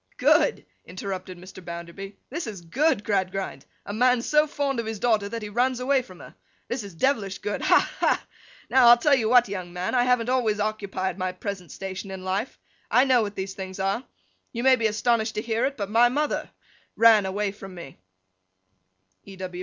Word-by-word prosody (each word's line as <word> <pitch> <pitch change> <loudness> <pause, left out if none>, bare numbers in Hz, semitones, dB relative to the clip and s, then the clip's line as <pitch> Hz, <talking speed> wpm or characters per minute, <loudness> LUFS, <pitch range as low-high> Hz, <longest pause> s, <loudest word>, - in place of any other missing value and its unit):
'Good!' - - +3 0.2
interrupted 185 0 -6
Mr. 185 +1 -12
Bounderby. 170 +4 -8
'This 320 -1 -4
is 200 -5 -7
good, 215 - +1
Gradgrind! 195 -2 -2 0.2
A 205 - -5
man 245 +2 +3
so 300 +2 +3
fond 280 -3 -2
of 230 - -3
his 220 -1 -3
daughter, 215 -2 +1
that 230 0 -5
he 210 - -5
runs 250 +4 +1
away 265 +1 +2
from 185 -8 -14
her! - - -12 0.3
This 240 -1 -3
is 200 -4 -10
devilish 205 -3 0
good! 205 - -4
Ha! - - +3
ha! - - +1 0.4
Now, 260 -2 +5
I'll 240 0 +9
tell 285 +4 +3
you 230 -5 +2
what, 245 -1 +6
young 185 -3 -5
man. 180 +1 -3
I 245 -1 +3
haven't 250 -2 +2
always 230 -5 +1
occupied 200 -3 -2
my 185 0 -1
present 185 -4 -6
station 195 +1 -6
of 190 0 -6
life. 190 +6 -3 0.3
I 250 - +5
know 255 -3 +4
what 205 -1 -3
these 190 0 -4
things 190 0 -7
are. 195 +5 -1 0.5
You 235 0 -4
may 265 0 +6
be 225 -3 +1
astonished 220 +1 0
to 215 - -1
hear 230 +1 0
it, 275 - -6
but 200 -3 -3
my 230 +4 +4
mother—ran 230 -6 +1
away 200 +1 -1
from 195 -2 -11
me.' 155 - -11 1.2
E. 195 -1 -12
210 Hz, 195 wpm, -25 LUFS, 190-245 Hz, 1.2 s, I'll